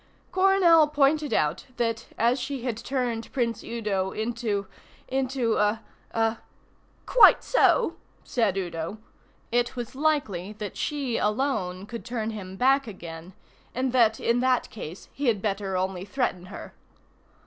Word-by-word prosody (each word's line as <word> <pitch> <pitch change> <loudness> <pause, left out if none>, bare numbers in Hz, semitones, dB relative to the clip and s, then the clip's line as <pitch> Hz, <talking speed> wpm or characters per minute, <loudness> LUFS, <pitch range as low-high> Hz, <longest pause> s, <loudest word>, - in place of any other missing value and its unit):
Coronel 370 -5 +5
pointed 295 0 +2
out 155 -4 +1
that 230 -1 -1
as 240 +4 +2
she 265 0 -4
had 245 -3 -1
turned 240 -2 -3
Prince 230 -4 -1
Udo 210 -5 -2
into 220 -2 -2 0.4
into 260 -3 0
a 210 +2 +1 0.3
a 225 0 0 0.7
("Quite - - +7
so," - - +3 0.3
said 220 -6 0
Udo) 170 +1 -3 0.5
it 245 +1 +1
was 240 -2 -5
likely 260 - 0
that 210 -1 -6
she 275 -6 -2
alone 210 -5 -1
could 235 +1 -7
turn 230 -2 -3
him 190 -3 -7
back 270 +4 +3
again, 170 -3 -9 0.4
and 255 +1 0
that 225 -3 +4
in 235 +1 +2
that 255 0 +1
case 180 -4 -8
he 280 -1 -2
had 220 -4 +3
better 195 -2 -2
only 185 0 -2
threaten 200 -5 -2
her. 205 - -9
230 Hz, 135 wpm, -26 LUFS, 200-260 Hz, 0.7 s, Quite